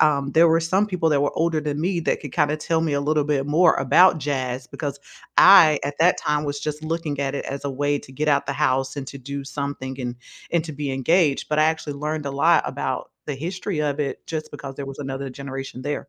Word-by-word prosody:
Um, 140 -3 +2
there 165 +1 +6
were 165 +1 +4
some 190 +6 +1
people 180 -5 0
that 145 - +3
were 145 - +1
older 165 -1 +1
than 150 0 -3
me 175 0 0
that - - -1
could 145 -4 -8
kinda 150 -2 +1
tell 160 +1 0
me 160 -2 0
a 140 - +1
little 150 +1 +1
bit 140 -2 0
more 160 +3 +4
about 160 +6 +5
jazz 130 -3 -3
because 145 0 -5 0.4
I, 170 -6 +8
at 145 0 -3
that 180 +2 +4
time, 150 0 0
was 145 0 -3
just 150 0 -4
looking 155 -3 -3
at 140 0 -1
it - - -4
as 140 +1 -6
a 140 - -1
way 145 +2 0
to - - -15
get 150 +4 -2
out 140 -1 +2
the - - -1
house 135 -1 0
and 135 - -5
to 140 - -8
do 140 +2 -6
something 140 -2 -5
and 125 -1 -4 0.3
and 170 -1 +1
to 155 - -6
be 145 -1 -4
engaged, 145 +2 +2
but 150 0 0
I 155 - +5
actually 160 -2 -1
learned 150 0 -3
a - - -2
lot 160 +3 +4
about - - -3 0.2
the 145 - -3
history 180 +2 -3
of 150 -1 -1
it 140 -2 -4
just 155 -1 -5
because 135 -1 -8
there 140 - -5
was 135 - -8
another 135 -1 -5
generation 135 -1 -7
there. 145 0 -4
145 Hz, 245 wpm, -23 LUFS, 140-160 Hz, 0.4 s, I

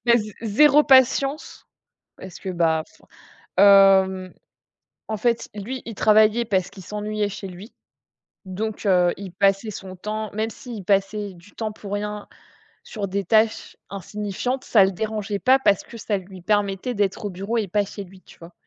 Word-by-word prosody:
mais 235 - +6
z 210 0 -8
zéro 295 +7 +5
patience, 270 +2 +2 0.5
parce 190 -1 -10
que, 195 - -8
bah, 165 -3 +1
enfin, - - -24 0.5
hem, 190 -2 +5 0.8
en 220 -1 -3
fait, 235 +2 0
lui, 235 +6 -5
il 225 -3 -7
travaillait 215 +2 +4
parce 190 -4 0
qu'il 195 -1 -13
s'ennuyait 210 +1 -3
chez 195 0 -7
lui, 190 +5 -11 0.7
donc 215 +3 -5
heu, 180 -2 +3
il 195 -2 -8
passait 195 +3 +1
son 190 -2 -9
temps 215 +3 -5
même 220 +2 -2
s'il 235 -3 -9
passait 200 +1 0
du 175 +4 -18
temps 220 -1 -4
pour 205 -1 -9
rien 210 0 -4 0.6
sur 205 -3 -5
des 200 +1 -2
tâches 220 +3 +1
insignifiantes, 210 +6 -4
ça 200 -4 +5
le 195 - 0
dérangeait 210 +1 -3
pas 260 +4 +4
parce 200 -7 +2
que 235 - -12
ça 210 -2 -2
lui 190 0 -11
permettait 205 +3 -1
d'être 205 -1 -1
au - - -2
bureau 195 +5 -3
et 215 -3 -1
pas 205 +3 +1
chez 200 +1 -8
lui, 190 0 -16
tu - - -18
vois? 170 +1 -13
205 Hz, 175 wpm, -23 LUFS, 195-220 Hz, 0.8 s, mais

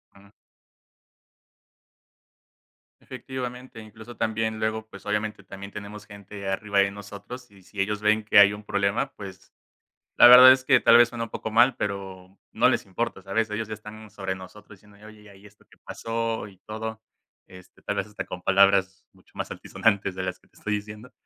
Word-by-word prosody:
Ujú. 100 0 -19 2.7
Efectivamente. 125 -1 -8
Incluso, 110 +2 -13
también, 110 0 -2
luego, 110 0 -2
pues 100 - -13
obviamente, 105 0 -3
también 100 +1 -10
tenemos 105 0 -9
gente 100 -1 -10
arriba 100 +1 -1
de 100 0 +3
nosotros, 105 +5 -10
y 100 -1 -19
si 95 +2 -12
ellos 105 +2 -1
ven 105 +1 +2
que 105 - +5
hay 100 0 +7
un 105 +1 -9
problema, 100 +6 -1
pues, 95 -2 -12 0.6
la - - +9
verdad, 125 +1 +10
es 130 0 +2
que 130 -2 +5
tal 115 0 +6
vez, 120 0 +6
suena 120 -1 -5
un - - -14
poco 110 - -6
mal, 120 +3 +4
pero 95 -1 -6
no - - +3
les - - -1
importa, 100 +1 -4
¿sabes? 105 +4 -2
Ellos, 105 +1 -4
ya 110 - -6
están 110 +1 -12
sobre 95 -2 -5
nosotros, 100 +2 -14
diciendo: 105 +1 -21
"Oye, 105 - -17 0.2
ya 105 - -16
vi 95 - -18
ya - - -22
vi - - -17
esto, 105 0 -20
¿qué - - -22
pasó?", 115 -1 -4
y 95 -2 -17
todo. 110 +1 -6 0.5
Este, 90 -1 -17
tal - - -3
vez - - -2
hasta 105 - -7
con 90 - -8
palabras 95 0 +3
mucho - - -25
más - - -5
altisonantes, 100 -3 -1
de 95 - -4
las 95 -1 -5
que - - -29
te - - -27
estoy 105 - -3
diciendo, 105 +3 -9
105 Hz, 190 wpm, -25 LUFS, 100-110 Hz, 2.7 s, verdad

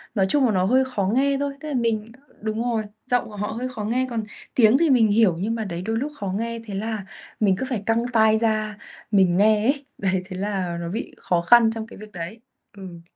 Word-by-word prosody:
nói 195 - +3
chung 280 +1 +4
là 230 - +2
nó 185 -2 +2
hơi 260 +5 +3
khó 215 -7 -2
nghe 275 +1 +2
thôi, 285 -1 -2
tức 310 - -8
là 295 - -3
mình 230 -2 -1 0.3
đúng 220 +1 -2
rồi, 230 -3 0 0.2
giọng 245 -1 +2
của 210 - -10
họ 210 +1 -3
hơi 240 +4 -4
khó 225 -5 -6
nghe, 250 +4 0
còn 225 -2 -2 0.3
tiếng 235 +1 +6
thì 330 -1 +3
mình 240 -4 +5
hiểu, 205 -5 +3
nhưng 225 +4 -1
mà, 225 - -2
đấy, 175 -2 -4
đôi 225 +3 -2
lúc 285 +5 -2
khó 200 - -4
nghe, 230 +1 -3
thế 205 - -7
là 215 -1 -3 0.3
mình 195 -3 +3
cứ 260 - -2
phải 225 -6 -2
căng 230 +1 +1
tai 220 -1 +5
ra 215 -2 0 0.3
mình 185 -3 +4
nghe 210 +1 +4
ấy. 280 +1 +1
Đấy, 190 -1 0
thế 185 -1 -7
là 190 -4 -2
nó 170 - -4
bị 215 - -5
khó 175 -1 0
khăn 225 +5 +6
trong 225 0 -5
cái - - -12
việc 215 +1 -11
đấy. 180 +6 -7 0.4
Ừ. 175 -3 -10
220 Hz, 245 wpm, -23 LUFS, 195-235 Hz, 0.4 s, tiếng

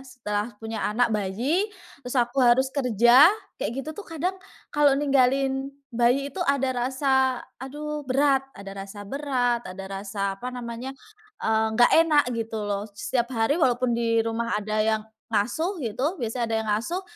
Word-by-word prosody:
Setelah 210 -5 -3
punya 225 +1 -5
anak 225 +2 +1
bayi 235 - 0 0.3
terus 250 0 -5
aku 245 +2 +1
harus 255 +2 +4
kerja, 250 - +6 0.3
kayak - - -1
gitu 310 - -5
tuh 315 - -8
kadang, 330 +3 -2 0.4
kalau 290 -2 +4
ninggalin 270 -1 +2 0.2
bayi 250 +4 +2
itu 380 - -6
ada 270 -2 +2 0.2
rasa 265 -1 +1 0.2
aduh 300 +3 -5
berat, 270 0 +2
ada 195 0 -8
rasa 205 +1 -9
berat, 250 -1 0
ada 190 +1 -7
rasa 195 0 -3
apa 250 - -4
namanya, 235 +1 -6 0.6
eee, 220 0 +2
nggak 240 - +5
enak 305 -3 +4
gitu 225 -2 -3
loh. 205 0 -2
Setiap 240 +2 -1
hari 285 +9 +1
walaupun 245 -2 +2
di 230 -1 +1
rumah 230 -1 -1
ada 215 +1 -1
yang 220 0 +1 0.3
ngasuh 315 - 0
gitu, 255 - -1
biasanya 235 +1 -2
ada 225 - 0
yang 220 - -6
ngasuh, 330 - -1
245 Hz, 155 wpm, -25 LUFS, 220-275 Hz, 0.6 s, kerja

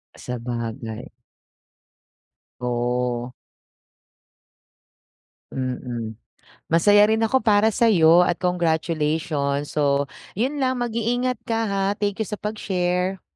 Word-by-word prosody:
Sabagay. 115 -2 -5 1.5
Oh. 125 0 -1 2.2
Mm, 120 -4 -4 0.5
masaya 205 +5 +5
rin 220 +1 +1
ako 225 +4 +3
para 215 -3 +3
sa'yo 180 -6 +5
at 175 - +1
congratulations. 160 -4 0
So 140 -1 +1 0.2
'yun 260 +8 -1
lang 260 -2 0
mag-iingat 240 +1 -1
ka, 225 -1 0
ha. 195 0 0
Thank 205 0 -2
you, 220 - -1
sa 210 - -4
pag-share. 185 -3 -2
175 Hz, 90 wpm, -23 LUFS, 130-215 Hz, 2.2 s, masaya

